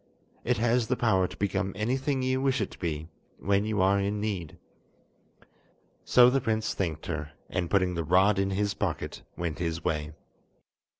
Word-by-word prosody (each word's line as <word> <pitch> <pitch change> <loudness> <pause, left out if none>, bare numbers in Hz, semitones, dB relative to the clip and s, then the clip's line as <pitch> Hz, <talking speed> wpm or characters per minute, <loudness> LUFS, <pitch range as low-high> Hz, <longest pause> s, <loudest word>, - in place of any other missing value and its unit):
It 125 0 +1
has 120 +1 +2
the 125 - +1
power 95 -6 +2
to - - -12
become 95 -1 -1
anything 130 +4 -1
you 130 0 +1
wish 135 -1 +1
it 105 - -2
to - - -13
be, 80 -3 -3 0.3
when 100 +2 +1
you 105 -3 +1
are 100 +1 +4
in 100 +1 -1
need." 100 -6 -3 1.5
So 125 -1 +7
the 135 +1 +2
prince 110 -2 0
thanked 80 -5 -3
her, 80 -2 -4 0.2
and 90 -2 -1
putting 95 -2 +2
the 85 -1 -2
rod 95 +5 +4
in 95 0 +1
his 100 +1 0
pocket, - - -3 0.2
went 85 -3 -3
his 85 -1 -2
way. 75 0 -2
100 Hz, 175 wpm, -28 LUFS, 85-115 Hz, 1.5 s, So